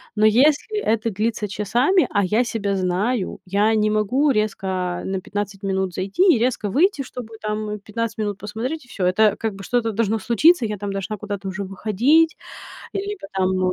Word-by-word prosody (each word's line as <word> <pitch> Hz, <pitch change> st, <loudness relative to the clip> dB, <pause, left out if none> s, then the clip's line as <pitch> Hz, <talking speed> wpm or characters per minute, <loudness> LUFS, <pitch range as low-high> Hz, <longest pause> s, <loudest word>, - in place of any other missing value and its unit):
Но 215 Hz, 0 st, +3 dB
если 290 Hz, -, +3 dB
это 225 Hz, 0 st, +1 dB
длится 215 Hz, +1 st, -1 dB
часами, 240 Hz, -, +2 dB
а 205 Hz, -2 st, +1 dB
я 215 Hz, +6 st, +2 dB
себя 205 Hz, -4 st, -2 dB
знаю, 190 Hz, +4 st, -1 dB
я 205 Hz, +4 st, +2 dB
не 215 Hz, 0 st, +2 dB
могу 245 Hz, +8 st, +2 dB
резко 215 Hz, -4 st, -1 dB, 0.4 s
на 190 Hz, 0 st, -2 dB
15 205 Hz, -1 st, -4 dB
минут 190 Hz, -1 st, -1 dB
зайти 195 Hz, -, 0 dB
и 235 Hz, -, +1 dB
резко 230 Hz, -3 st, 0 dB
выйти, 310 Hz, -, +2 dB
чтобы 240 Hz, -3 st, -9 dB
там 210 Hz, 0 st, -3 dB
15 220 Hz, +3 st, -4 dB
минут 205 Hz, -2 st, -2 dB
посмотреть 245 Hz, +8 st, -4 dB
и -, -, -23 dB
всё. 195 Hz, -5 st, -3 dB
Это, 210 Hz, +3 st, +3 dB
как 220 Hz, -2 st, -2 dB
бы, 195 Hz, 0 st, -10 dB
что-то 230 Hz, +1 st, 0 dB
должно 220 Hz, 0 st, 0 dB
случиться, 245 Hz, -, +4 dB
я 210 Hz, -1 st, -3 dB
там 205 Hz, 0 st, -3 dB
должна 195 Hz, +2 st, -4 dB
куда-то 200 Hz, -1 st, -5 dB
уже 190 Hz, +2 st, -4 dB
выходить, 225 Hz, -, +2 dB, 0.6 s
либо 400 Hz, -4 st, -4 dB
там 185 Hz, -1 st, +1 dB
215 Hz, 180 wpm, -22 LUFS, 195-240 Hz, 0.6 s, случиться